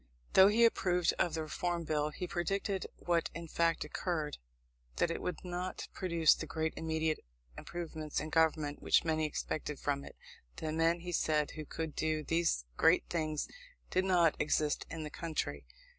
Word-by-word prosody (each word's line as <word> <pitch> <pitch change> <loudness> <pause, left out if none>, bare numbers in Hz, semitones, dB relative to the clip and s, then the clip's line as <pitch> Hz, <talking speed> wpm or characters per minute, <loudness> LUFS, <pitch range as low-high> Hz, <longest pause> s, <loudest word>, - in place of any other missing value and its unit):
Though 190 0 +9
he 225 +3 +5
approved 180 -6 +2
of 170 -2 +2
the 160 - -1
Reform 170 +2 -2
Bill, 150 -1 0
he 165 +4 -5
predicted, 195 +2 -1
what 170 -1 +1
in 170 0 -6
fact 165 +1 +1
occurred, 155 -1 -3 0.6
that 170 - +1
it - - -3
would 180 - -2
not 180 +1 -4
produce 170 -4 +4
the - - -5
great 160 0 -1
immediate 160 -1 0 0.4
improvements 160 - -4
in 155 +1 -5
government 155 -3 +2
which - - +4
many 155 -1 +1
expected 150 -1 -3
from 140 -1 -1
it. - - -11 0.4
The 155 - -3
men, 165 +2 +2
he 175 0 -5
said, 155 -3 +1
who 155 -1 -7
could 160 +1 -4
do 155 -1 0
these 165 - +1
great - - +5
things 155 -3 -1 0.4
did 185 +1 +2
not 175 -4 +4
exist 150 0 +1
in 160 -1 -5
the 150 - -6
country. 145 - -3
160 Hz, 170 wpm, -33 LUFS, 155-175 Hz, 0.6 s, Though